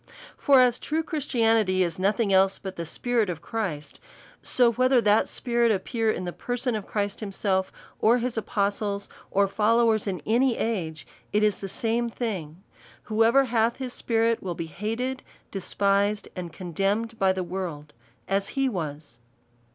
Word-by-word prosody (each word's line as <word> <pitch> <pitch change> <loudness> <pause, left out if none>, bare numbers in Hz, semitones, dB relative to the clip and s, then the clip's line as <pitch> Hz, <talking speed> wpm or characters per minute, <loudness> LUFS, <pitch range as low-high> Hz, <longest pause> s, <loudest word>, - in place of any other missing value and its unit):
For 275 -2 +5
as 250 -1 +3
true 315 +2 -1
Christianity 225 - +2
is 170 0 -3
nothing 200 +2 +1
else 190 +1 +4
but 190 -1 -7
the 170 -1 -5
spi 245 - -5
rit 225 -5 +3
of 165 -2 -5
Christ, 170 -11 -4 0.4
so 245 -2 +3
whether 255 +2 +3
that 210 -1 +3
spirit 235 -2 +1
appear 220 +3 0
in 185 - -1
the 175 - -4
per 245 0 -4
son 250 0 -1
of 215 -2 -4
Christ 205 -1 -2
himself, 195 -2 -1 0.3
or 230 +3 +4
his 245 0 -2
apostles, 200 -1 -1 0.2
or 200 0 +3
followers 220 +1 +2
in 180 -6 -3
any 240 +2 +2
age, 170 -9 -2 0.3
it 210 +1 +2
is 210 -2 +2
the 195 - -5
same 235 +4 -1
thing: 190 -8 -5 0.4
whoever 225 +5 +4
hath 230 -1 +1
his 255 -2 -6
spirit 230 0 +1
will 180 -3 -4
be 165 - -4
hated, 225 - -3 0.3
despised, 200 +2 0
and 175 -3 -5
condemned 200 +6 -2
by 190 -1 +4
the 190 -1 -2
world 170 -5 -5 0.3
as 195 0 0
he 270 0 +3
was. 150 - -5
210 Hz, 165 wpm, -26 LUFS, 190-230 Hz, 0.4 s, For